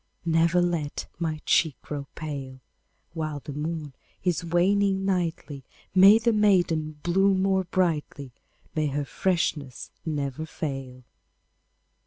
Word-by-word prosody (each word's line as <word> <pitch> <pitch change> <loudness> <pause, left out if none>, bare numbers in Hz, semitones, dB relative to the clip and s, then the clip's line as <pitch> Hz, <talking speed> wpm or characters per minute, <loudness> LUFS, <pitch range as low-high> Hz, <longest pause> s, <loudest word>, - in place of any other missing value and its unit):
Never 165 +2 +3
let 165 -5 -2
my 160 -2 -2
cheek 160 -5 +2
grow 145 -2 -5
pale! 140 -4 -6 0.5
While 155 -3 -3
the 145 - -7
moon 150 -1 -4 0.3
is 175 -3 0
waning 195 +3 +2
nightly, 170 -7 -2 0.3
May 195 +3 +8
the 230 0 +2
maiden 175 -7 +2
bloom 190 +2 +3
more 190 -1 +2
brightly, 155 -6 -1 0.4
May 155 -1 0
her 145 +1 -2
freshness 150 -6 -2
never 150 -1 -3
fail! 135 -5 -5
165 Hz, 115 wpm, -26 LUFS, 145-185 Hz, 0.5 s, May